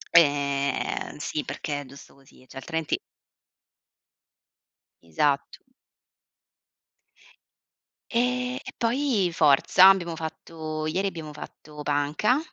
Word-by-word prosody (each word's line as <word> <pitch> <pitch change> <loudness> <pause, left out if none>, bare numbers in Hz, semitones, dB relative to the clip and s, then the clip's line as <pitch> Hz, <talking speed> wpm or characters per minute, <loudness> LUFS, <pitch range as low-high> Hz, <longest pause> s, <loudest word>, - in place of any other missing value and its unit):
Ehm, 140 -3 +2
sì, 150 0 -3
perché 145 -2 -4
è - - -10
giusto 140 +1 -14
così, 135 -1 -21
cioè, - - -12
altrimenti 160 +3 -2 2.1
Esatto. 140 - 0 2.5
Ehm, 250 +1 0
e - - -8
poi 235 -5 +1
forza, 160 +3 +6
abbiamo 175 -4 +2
fatto 160 -1 -6
ieri 185 +6 0
abbiamo 160 -5 -6
fatto 150 0 -10
panca 145 - +1
155 Hz, 90 wpm, -26 LUFS, 145-190 Hz, 2.5 s, forza